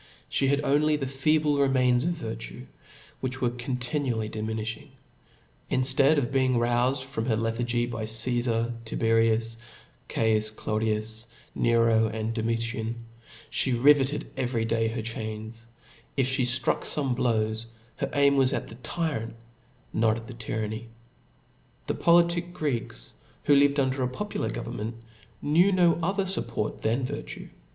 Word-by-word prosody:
She 135 - +1
had 140 +1 +2
only 150 +2 +3
the 145 -2 -2
feeble 145 +2 +2
remains 130 -3 +3
of - - +2
vir 115 -9 -5
tue» 115 +2 -9 0.5
which 130 0 -4
were 125 -2 +1
continually 120 -2 -2
diminifhing: 110 0 -4 0.8
inftead 135 +3 +4
of 135 -2 0
being 130 -2 +2
roufed 120 0 +2
out 130 +2 0
of 110 - -1
her 115 - +2
lethargy, 120 +2 0
by 115 -2 -4
Csfar, 115 +1 +1
Tiberius, 115 0 +1 0.5
Caius 110 -1 +2
Claudius, 110 +1 -2 0.3
Nero, 115 -1 +3
Domitian, 115 +1 -2 0.6
fhe 130 -3 +1
ri 145 +1 +10
veted 145 +1 -1
every 120 -3 -1
day 115 0 +1
her 115 0 -3
chains; 110 0 -6 0.5
if 130 -1 +2
(he 130 -2 +1
ftruck 125 +1 +1
fome 140 -4 -1
blows, 110 -2 0 0.3
her - - -2
aim 140 -1 +4
was 135 0 +3
at - - -3
the 115 - -9
tyrant> 145 -11 -2 0.6
but - - -2
not 110 0 +3
at 115 - -8
the 125 - -9
ufurpation. 110 -1 -4 1.0
The - - -1
politic 170 +1 +3
Greeks, 115 - -3 0.3
who 145 - +5
lived 140 0 +4
under 130 0 +1
a 125 - +2
popular 210 +12 -3
government, 105 - -5 0.5
knew 170 +7 +4
no 175 -3 +3
other 195 +4 0
fupport 120 - -2
than 120 +4 0
virtue. 145 +3 -6
120 Hz, 145 wpm, -27 LUFS, 115-135 Hz, 1.0 s, ri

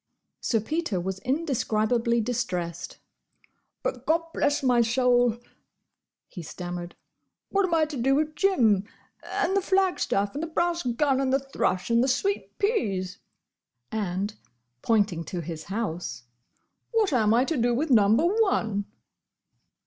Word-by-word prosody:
Sir 225 - +1
Peter 300 - -2
was 190 +2 -4
indescribably 235 - 0
distressed. 185 -8 -3 0.9
"But—Gobblessmysoul!—" 250 - +2 0.9
he 180 - -9
stammered—"what 175 - -5
am 350 - -2
I 315 -1 +3
to 300 -2 -6
do 265 +3 +2
with 305 +1 0
Jim, 225 - +3 0.4
and 380 +3 -1
the 395 - +3
flagstaff, 365 - +1
and 290 - -4
the 330 - -2
brass 340 +1 0
gun, 265 +2 +1
and 265 -1 0
the 270 - +4
thrush, 240 -7 -1
and 235 +1 +4
the - - +1
sweet 395 +10 -1
peas?" 200 - -1 0.7
and, 205 -1 -2 0.5
pointing 205 -7 +1
to 175 - -4
his 160 -1 -7
house, 175 - -4 0.7
"What 430 -8 +2
am 220 -4 +3
I 250 +2 +3
to 320 - -1
do 245 -2 +2
with 295 +4 -1
Number 220 +5 +5
One?" 345 - +1
240 Hz, 125 wpm, -26 LUFS, 200-310 Hz, 0.9 s, Number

